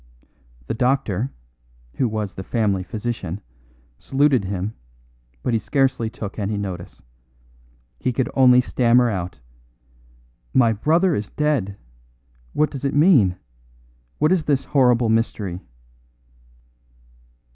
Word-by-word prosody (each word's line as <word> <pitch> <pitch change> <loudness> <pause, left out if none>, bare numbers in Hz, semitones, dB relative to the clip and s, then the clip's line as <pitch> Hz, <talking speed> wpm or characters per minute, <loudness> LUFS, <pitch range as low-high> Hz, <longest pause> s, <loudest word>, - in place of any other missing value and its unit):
The - - -3
doctor, 125 -2 0 0.7
who 130 - +2
was 105 -3 -3
the 95 - -7
family 100 -3 0
physician, 105 -2 -4 0.6
saluted 135 -5 +2
him, 100 +2 -3 0.7
but 125 - 0
he 115 - +2
scarcely 130 -1 0
took 105 -1 -7
any 105 +1 -2
notice. 95 -4 -6 1.0
He 130 - 0
could 125 +1 -1
only 125 -2 +6
stammer 120 -1 +3
out: 90 -4 -4 1.2
"My 115 -3 +5
brother 165 - +2
is 105 -6 -3
dead. 135 -11 -1 0.8
What 150 - +1
does 135 -2 -7
it 140 0 -1
mean? 145 - +5 0.8
What 155 - +2
is 180 -4 +2
this 140 -3 +1
horrible 125 -4 +3
mystery?" 105 -5 -1
115 Hz, 115 wpm, -22 LUFS, 100-135 Hz, 1.2 s, only